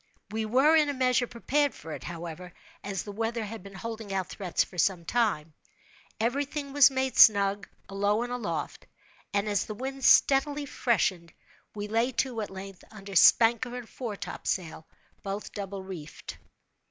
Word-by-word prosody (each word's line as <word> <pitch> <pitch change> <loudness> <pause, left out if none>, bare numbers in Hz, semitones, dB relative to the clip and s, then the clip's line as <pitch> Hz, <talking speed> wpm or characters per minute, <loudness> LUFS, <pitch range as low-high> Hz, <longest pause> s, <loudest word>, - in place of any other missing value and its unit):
We 220 0 -2
were, 270 +8 +4
in 305 -2 +4
a 285 - -2
measure, 255 -1 +2
prepared 285 +5 0
for 160 - -10
it, - - -7
however, 175 +1 -7 0.3
as 195 -2 -3
the 205 - -7
weather 225 +2 -2
had 225 0 -7
been 195 +1 -12
holding 220 +1 -6
out 190 -2 -2
threats 185 -4 -1
for 180 - -9
some 175 -1 +1
time. 185 -9 0 0.7
Every 245 +6 +1
thing 285 -1 -6
was 285 -2 +7
made 265 -1 -2
snug, 200 -1 +6 0.2
alow 205 +3 0
and 245 0 -4
aloft; 240 -4 -4 0.4
and 200 +1 0
as 205 -2 0
the 215 - -5
wind 265 +3 -6
steadily 285 +1 +4
freshened, 185 - 0 0.4
we 205 0 -4
lay 230 +4 +1
to, 240 -2 -1
at 210 - -5
length, 195 -1 -9
under 200 -2 -10
spanker 235 +6 +5
and 245 -2 -8
foretopsail, 190 -8 -5 0.3
both 200 +1 -5
double 195 -1 -6
reefed. 175 -6 -9
215 Hz, 165 wpm, -28 LUFS, 195-250 Hz, 0.7 s, was